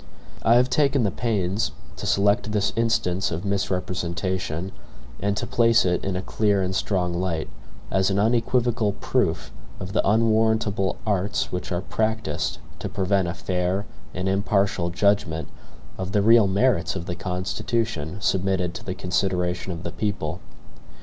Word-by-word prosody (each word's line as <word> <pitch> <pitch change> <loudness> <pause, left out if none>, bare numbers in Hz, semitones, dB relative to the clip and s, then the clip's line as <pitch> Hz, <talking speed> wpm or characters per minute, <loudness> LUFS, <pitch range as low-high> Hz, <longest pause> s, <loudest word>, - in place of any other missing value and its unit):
I 115 - +5
have 125 +1 +5
taken 140 -2 +2
the 100 - +1
pains 105 -2 -1 0.2
to - - -4
select 100 +1 +2
this 105 -1 +1
instance 100 -5 +1
of 85 +4 -4
misrepresentation, 90 -2 -2 0.5
and 100 0 0
to - - -1
place 115 -1 +4
it 90 -1 +1
in 95 -1 -2
a 90 - -2
clear 105 -2 +1
and 95 +1 -2
strong 90 -2 0
light, 85 -3 -1 0.4
as 95 0 +2
an 95 - 0
unequivocal 115 0 +2
proof 100 - -1 0.3
of 95 +1 -6
the - - +3
unwarrantable 110 -2 +2
arts 100 -1 0
which 90 +1 -4
are 90 0 0
practiced 110 +2 -1 0.2
to - - -4
prevent 95 -1 +1
a 85 - -3
fair 90 +3 -1 0.3
and 90 +1 -3
impartial 95 -2 +1
judgment 90 -4 +1 0.5
of 95 0 -4
the 105 - +3
real 115 -1 +6
merits 100 -2 +2
of 85 - -4
the 90 - -3
Constitution 95 0 -2
submitted 95 -3 +1
to - - -8
the 95 - -4
consideration 90 0 -1
of 85 -2 -6
the 85 - -4
people. 105 +3 -2
95 Hz, 150 wpm, -24 LUFS, 90-110 Hz, 0.5 s, real